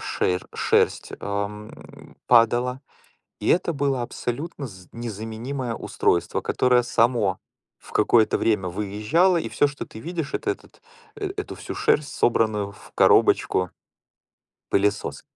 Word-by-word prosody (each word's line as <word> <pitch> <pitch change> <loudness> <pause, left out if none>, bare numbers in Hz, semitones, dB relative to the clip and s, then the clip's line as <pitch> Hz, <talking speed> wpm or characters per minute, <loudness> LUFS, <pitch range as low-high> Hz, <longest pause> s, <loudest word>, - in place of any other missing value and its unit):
ше 90 0 0
шерсть, - - +1
эм, 100 +1 -6
падала. 120 +2 +4 0.6
И - - -4
это 170 -1 +2
было 140 -3 0
абсолютно 135 +4 -4
з 95 -4 -14
незаменимое 115 +3 -5
устройство, 85 - 0
которое 125 -1 +2
само 115 -5 +2 0.4
в - - -16
какое-то 110 0 +3
время 105 -5 +1
выезжало, 105 - +1
и - - -2
всё, 145 - +3
что 145 -1 -6
ты 110 - -11
видишь, 165 0 -4
это 395 - 0
этот 390 - -11 0.3
эту 405 -1 -5
всю - - -7
шерсть, 150 -1 +1
собранную 105 -4 +1
в - - -16
коробочку 90 -2 +4 1.0
пылесос 100 +1 0
115 Hz, 120 wpm, -24 LUFS, 105-140 Hz, 1.0 s, падала